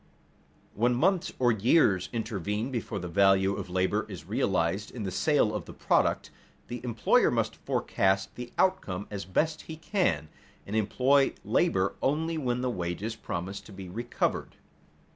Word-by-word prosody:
When 120 +3 +2
months 185 +7 +2
or 125 -1 +3
years 110 - +3
intervene 110 +1 -2
before 120 -4 -3
the 90 - -4
value 95 +1 +4
of - - -5
the 90 - -10
labor 95 +3 +1
is 90 -6 -8
realized 95 -1 0
in 115 - -6
the 95 - -3
sale - - +2
of - - -4
the - - -10
product, - - +1 0.4
the 120 0 -6
employer 120 -3 +3
must - - 0
forecast 95 0 0
the 125 -1 -8
outcome 105 - +1
as 100 -2 -4
best 155 - 0
he 160 - -6
can, 175 - 0 0.4
and 100 - -5
employ 130 +6 +3
labor 95 +1 +2
only 160 +4 0
when 125 -3 -1
the 125 -1 0
wages 90 +3 -3
promise 95 -2 -5
to - - -14
be 95 -2 -9
recovered. 120 +6 -2
105 Hz, 160 wpm, -28 LUFS, 95-125 Hz, 0.4 s, value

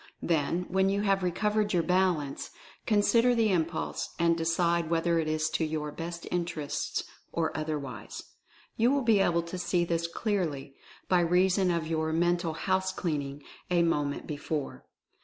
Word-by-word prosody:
Then, 165 +2 +1
when 190 +1 +2
you 200 +1 +1
have 195 -1 +2
recovered 210 +4 0
your 170 -2 +2
balance, 180 -5 0 0.4
con 205 -2 +3
sider 240 +3 +4
the 225 -3 +3
impulse, 165 -2 -1
and 170 -1 +3
decide 170 0 +1
whether 170 0 +2
it 160 - -1
is 155 0 0
to - - 0
your 155 -1 -2
best 170 +2 -6
interests, 170 -4 -2 0.3
or 165 -1 -1
otherwise. 145 -8 -5 0.5
You 230 +2 +3
will 280 0 +2
be 225 -3 +4
able 170 -3 +2
to 170 +2 -6
see 175 -1 +1
this 170 0 -1
clearly, 170 -8 -2 0.3
by 180 - +4
reason 180 +2 +3
of 170 -2 0
your 160 0 -1
"mental 175 0 +1
house 190 +2 0
clean 165 -6 -1
ing" 140 +1 -8 0.3
a 175 -1 +3
moment 145 -4 0
before. 150 -1 -4
170 Hz, 160 wpm, -29 LUFS, 160-185 Hz, 0.5 s, sider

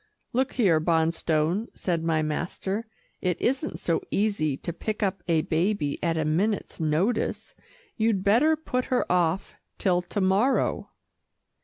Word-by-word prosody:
"Look 260 +2 +1
here, 190 -11 +3
Bonstone," 160 +4 +1
said 170 -3 -1
my 160 -1 +1
master, 190 +7 -3 0.3
"it 180 -2 0
isn't 270 +5 -1
so - - 0
easy 195 -9 0
to 170 - -5
pick 215 +5 -3
up 190 -2 -1
a 165 -2 +3
baby 165 -2 0
at 165 -2 0
a 160 - 0
minute's 195 +8 0
notice. 165 +9 0 0.4
You'd 220 -4 +1
better 240 +11 +4
put 255 -5 -2
her 255 - +1
off 180 0 +1 0.2
till 180 -2 +2
to 180 +3 -4
morrow." 200 +8 +2
185 Hz, 140 wpm, -26 LUFS, 160-220 Hz, 0.4 s, better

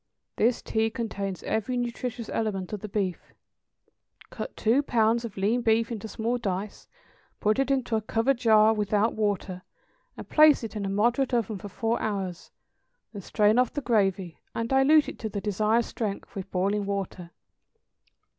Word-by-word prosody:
= - - -57
(This 235 +1 +2
tea 220 0 0
contains 200 -6 -4
every 220 +3 -1
nutritious 240 -1 -4
element 205 -4 -3
of 210 - -3
the 210 +2 -7
beef.) 195 -3 -3 1.0
Cut - - -7
two 235 +6 +3
pounds 230 -3 +2
of 225 -5 -7
lean 215 +6 +1
beef 230 0 +2
into 220 -1 -5
small 230 +3 -2
dice, 200 -1 -4 0.5
put 215 +4 +1
it 270 0 +1
into 260 -4 0
a 220 - +1
covered 230 +4 0
jar 220 -2 +5
without 210 +1 +1
water, 200 -3 -2 0.6
and - - -8
place 305 -4 +5
it 225 - -6
in 200 -2 -2
a - - -2
moderate 240 +6 +1
oven 220 -3 -1
for 205 - -8
four 225 +4 -1
hours, 195 -5 -3 0.6
then 205 - -6
strain 210 +4 +2
off 250 -2 +2
the 290 - -2
gravy, 195 - 0 0.2
and 230 0 -2
dilute 280 +3 +5
it - - -7
to 220 - -4
the 205 - -4
desired 215 +3 +1
strength 210 -4 -5
with 195 -1 -6
boiling 200 +2 0
water. 195 -3 -4
220 Hz, 170 wpm, -27 LUFS, 200-235 Hz, 1.0 s, jar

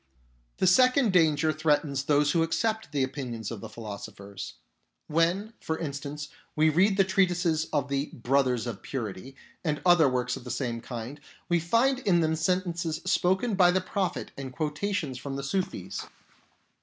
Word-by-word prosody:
The - - +1
second 255 +3 +5
danger 155 -3 +4
threatens 145 -2 +1
those 145 0 +3
who 170 - +2
accept 220 +4 0
the 140 -2 +1
opinions 125 -5 -4
of 110 -4 -6
the 110 - -7
philosophers. 100 -2 -8 0.5
When, 175 +7 +1
for 160 - -2
instance, 145 -1 -5 0.3
we 155 +1 +4
read 190 +5 +3
the 195 - +6
treatises 175 -4 +2
of 145 -2 0
the 140 +1 -1
" - - -22
Brothers 125 -3 +2
of 110 -6 -5
purity 120 0 -5
" - - -31
and 150 -3 0
other 175 -5 +6
works 125 -1 -1
of - - -9
the 125 - -8
same 120 -1 -2
kind, 125 +4 -7 0.3
we 175 -1 +3
find 230 +10 +2
in 190 -9 +3
them 160 0 +1
sentences 170 0 0
spoken 190 +5 +2
by 185 -2 +5
the 185 +1 +3
Prophet 190 0 -2
and 135 -1 -6
quotations 155 -1 -2
from 135 0 -5
the 140 - -4
Sufis. 140 - -3
155 Hz, 170 wpm, -28 LUFS, 135-180 Hz, 0.5 s, the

